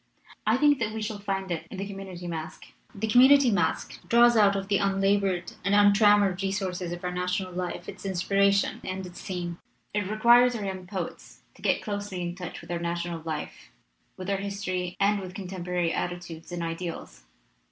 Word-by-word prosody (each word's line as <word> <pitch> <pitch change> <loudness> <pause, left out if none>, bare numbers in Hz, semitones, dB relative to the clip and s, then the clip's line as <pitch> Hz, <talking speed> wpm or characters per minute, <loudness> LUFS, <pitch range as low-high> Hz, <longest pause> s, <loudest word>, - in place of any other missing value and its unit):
I 220 +3 +4
think 290 0 +4
that 215 -2 -1
we 220 - -3
shall 215 -1 -4
find 195 -2 -3
it 165 -1 -3
in - - -8
the 195 - -3
community 195 -3 -8
masque. 160 -2 -6 0.3
The 205 +2 -2
community 260 +3 +7
masque 175 -5 -1
draws 240 0 +6
out 205 -2 +5
of 195 0 -3
the 200 -1 +2
un 195 -1 +1
labored 195 -2 +1
and 200 +2 +2
untrammeled 205 -2 +5
resources 190 -3 -2
of 175 +1 -6
our 180 - -2
national 180 +1 -2
life 180 -1 -4
its 190 -1 -9
inspiration 195 +1 +2
and 185 0 -4
its 180 0 -10
theme. 175 -2 -4 0.3
It 205 -2 -1
requires 240 +3 +5
our 210 -3 -3
young 190 -2 -5
poets 185 -3 -6
to - - -19
get - - +1
closely 205 -3 -4
in 175 0 -3
touch 180 -1 -7
with - - -10
our 170 - -1
national 170 0 -3
life, 155 -2 -5 0.5
with 185 - -7
our 195 - +1
history 190 -2 -3
and 200 +1 +3
with 185 -1 -8
contem 190 -2 -6
porary 180 -2 0
attitudes 175 -2 -5
and 175 -1 -3
ideals. 165 - -6
190 Hz, 190 wpm, -27 LUFS, 180-205 Hz, 0.5 s, community